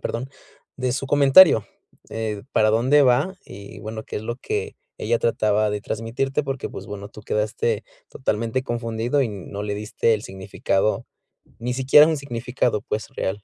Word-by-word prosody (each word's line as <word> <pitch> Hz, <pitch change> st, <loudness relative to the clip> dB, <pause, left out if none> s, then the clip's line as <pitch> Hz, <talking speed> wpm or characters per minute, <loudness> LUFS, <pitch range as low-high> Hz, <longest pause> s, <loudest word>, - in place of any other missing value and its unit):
perdón 130 Hz, +4 st, -4 dB, 0.5 s
de 130 Hz, -1 st, -1 dB
su 135 Hz, +1 st, -3 dB
comentario, 140 Hz, -, +7 dB, 0.4 s
eh, 110 Hz, -2 st, -3 dB
para 110 Hz, 0 st, +4 dB
dónde 130 Hz, +7 st, +4 dB
va. 135 Hz, +9 st, +3 dB
Y 100 Hz, 0 st, -11 dB
bueno, 110 Hz, +1 st, -6 dB
qué -, -, -6 dB
es 105 Hz, -, -4 dB
lo 120 Hz, +2 st, -4 dB
que -, -, -3 dB, 0.2 s
ella 115 Hz, +1 st, 0 dB
trataba 110 Hz, -2 st, +1 dB
de 105 Hz, 0 st, -2 dB
transmitirte 120 Hz, +7 st, -2 dB
porque, 135 Hz, -2 st, -3 dB
pues, -, -, -9 dB
bueno, 100 Hz, 0 st, -7 dB
tú 105 Hz, -, -12 dB
quedaste 105 Hz, +1 st, -1 dB, 0.3 s
totalmente 115 Hz, 0 st, -2 dB
confundido 120 Hz, +2 st, -1 dB
y 120 Hz, -, -1 dB
no 100 Hz, 0 st, -7 dB
le 105 Hz, -1 st, -2 dB
diste 105 Hz, +2 st, +1 dB
el 105 Hz, -, -4 dB
significado, 95 Hz, +1 st, -1 dB, 0.6 s
ni 125 Hz, +1 st, -2 dB
siquiera 135 Hz, +4 st, +7 dB
un 160 Hz, -2 st, 0 dB
significado, 125 Hz, -4 st, -2 dB
pues, 105 Hz, 0 st, -4 dB
real. 100 Hz, +2 st, -3 dB
115 Hz, 165 wpm, -23 LUFS, 105-130 Hz, 0.6 s, comentario